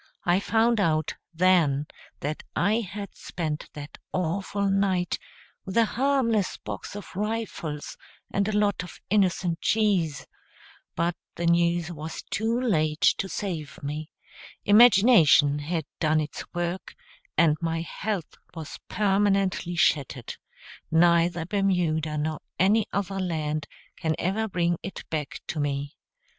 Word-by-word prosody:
I 175 +2 +4
found 225 +2 +2
out, 155 -5 +1 0.2
then, 165 -5 +3 0.4
that 150 +2 -3
I 215 +3 +2
had 205 -2 -6
spent 155 -4 -4
that 145 0 -9
awful 195 +3 -1
night 195 -2 +1 0.4
with 190 +2 -4
a 230 - +6
harmless 240 -5 +1
box - - -7
of 205 -3 -9
rifles 210 -8 -3 0.3
and 200 0 +1
a 215 -1 0
lot 205 -1 +2
of 180 - -10
innocent 180 -4 +2
cheese; 185 -10 +1 0.7
but 170 +1 0 0.2
the 170 - -3
news 170 0 +2
was 160 0 -6
too 225 +3 -1
late 155 -11 +3
to 195 - -2
save 165 -9 -4
me; 150 +2 -4 0.6
imagination 200 - +6
had 160 +1 -2
done 155 0 +3
its 150 -1 -5
work, 175 +1 -3 0.4
and 160 -3 +5
my 165 -1 -1
health 190 +1 -4 0.2
was 160 -3 -7
permanently 195 -3 +1
shattered; 140 -6 +1 0.6
neither 170 0 +3
Bermuda 175 -6 0
nor 155 +1 -2 0.2
any 205 +4 +3
other 195 -1 -2
land 155 -4 -2 0.3
can 160 -1 0
ever 210 +5 0
bring 175 -3 0
it 195 - -7
back 150 -3 -3
tome. 145 -2 -2
175 Hz, 125 wpm, -26 LUFS, 155-200 Hz, 0.7 s, a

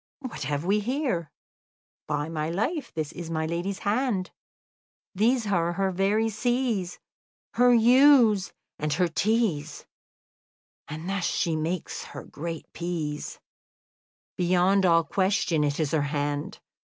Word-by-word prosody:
"What 255 - -7
have 145 +2 -2
we 200 +3 +2
here? 240 - -2 0.8
By 145 0 -1
my 155 -1 -3
life, 260 - -2
this 155 -2 -4
is 170 -2 -7
my 160 -1 -1
lady's 175 +4 -3
hand; 205 -3 -1 0.8
these 225 +4 +2
are 175 -4 +1
her 195 +1 0
very 200 +4 +1
C's, 225 -4 -1 0.6
her 245 +1 +5
U's, 240 -4 +5 0.3
and 150 0 -1
her 180 +3 +2
T's; 170 -5 -1 1.0
and 155 +3 -7
thus 195 -2 -1
she 165 -1 0
makes 160 +2 -3
her - - -9
great 165 +1 -6
P's. 160 -4 -4 1.0
Beyond 185 +2 +3
all 165 -1 +5
question 185 -2 +1
it 145 +1 -1
is 155 -3 0
her 160 - +2
hand." 145 0 -2
180 Hz, 125 wpm, -26 LUFS, 160-215 Hz, 1.0 s, her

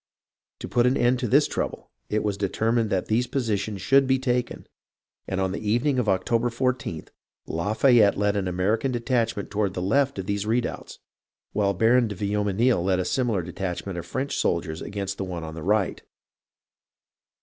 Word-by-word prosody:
To - - -5
put 120 0 +2
an 130 - +2
end 120 +1 +2
to 125 - -1
this - - +4
trouble - - -4 0.2
it 105 0 0
was 105 -2 0
determined 110 +3 0
that 95 -2 0
these 120 +3 +1
positions 105 -6 -2
should 135 +3 +4
be 130 0 +3
taken, 125 -2 -2 0.6
and 95 - -2
on 95 -1 0
the 100 - -4
evening 120 +6 +1
of 110 -4 0
October 115 +5 +1
14th, 120 - -2 0.4
Lafay 110 +8 +3
ette 100 -1 +4
led 105 0 +1
an 100 -2 -1
American 105 +8 0
detachment 120 -3 -1
toward 100 -2 -1
the 90 - -2
left 135 +7 +1
of 95 - -4
these 100 +1 -2
redoubts, 120 +2 -2 0.6
while 100 -2 +1
Baron 115 +4 +4
de 105 - -5
Viomenil 105 +2 +1
led 95 0 +2
a 90 - -1
similar 115 -8 0
detach 90 +1 -4
ment 95 -2 -5
of 85 - -6
French 135 +2 -3
soldiers 85 -2 -1
against 100 -1 -4
the - - -1
one 90 -3 -5
on 80 0 -6
the 80 - -7
right. 100 +2 0
105 Hz, 180 wpm, -25 LUFS, 95-120 Hz, 0.6 s, this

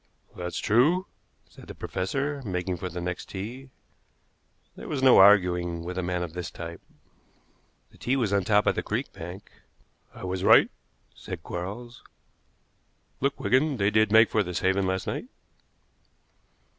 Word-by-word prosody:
"That's 90 0 -5
true," 150 - +3 0.4
said - - -16
the - - -9
professor, 140 +10 -3
making 90 -3 -3
for 90 +2 -5
the 90 +1 -6
next 90 0 -5
tee. 120 +8 -7 1.1
There - - -9
was 135 -3 -3
no 130 -2 +7
arguing 90 -4 +4
with 90 +1 -5
a 95 - -1
man 90 0 -2
of 85 -2 -6
this 90 -1 -5
type. 85 0 -8 1.1
The - - -21
tee 130 - 0
was 115 -7 0
on 100 - +4
the 95 - -5
top 105 -1 +3
of - - +3
the - - -2
creek - - -3
bank. 90 +4 -9 0.6
"I - - -12
was 95 0 -3
right," - - +6 0.4
said 90 -4 -8
Quarles. 105 +8 -6 1.2
"Look, 140 +1 -1
Wigan, 135 +2 +2
they 100 -1 +2
did 110 0 +3
make 110 +1 +6
for 110 - +2
this 90 -3 -3
haven 95 +1 +1
last 95 0 -1
night." - - -4
95 Hz, 160 wpm, -26 LUFS, 90-120 Hz, 1.2 s, no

